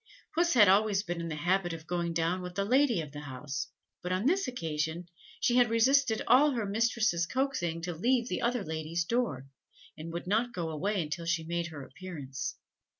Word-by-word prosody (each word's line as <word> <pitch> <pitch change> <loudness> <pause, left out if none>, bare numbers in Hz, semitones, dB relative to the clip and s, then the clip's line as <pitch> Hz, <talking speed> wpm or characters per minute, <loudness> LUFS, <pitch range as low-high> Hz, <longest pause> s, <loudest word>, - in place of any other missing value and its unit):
Puss 340 -1 +2
had 210 -4 +8
always 200 +1 +4
been 175 -2 -4
in 170 - -4
the 160 - -3
habit 175 +3 +1
of 160 -1 -8
going 170 0 -1
down 170 +3 0
with 180 0 -7
the 200 +1 0
lady 250 -4 +3
of 150 -3 -8
the 145 - -7
house, 140 0 -5 0.3
but 180 - -4
on 185 +4 0
this 370 +3 +2
occasion 165 -6 -3 0.3
she 245 - +2
had 245 -2 +5
resisted 235 +1 +3
all 285 +3 +5
her 230 -4 -1
mistress's 215 -4 +1
coaxing 175 -11 -1
to 175 0 -2
leave 235 +8 +1
the - - -2
other 240 -2 0
lady's 160 +1 -2
door, 230 - -1 0.5
and 160 +2 -7
would 170 +2 -5
not 225 +6 +1
go 165 -3 -3
away 190 +4 -1
until 165 +2 -5
she 165 -1 +1
made 170 +1 -2
her 150 -4 -8
appearance. 150 -5 -6
180 Hz, 200 wpm, -30 LUFS, 165-235 Hz, 0.5 s, had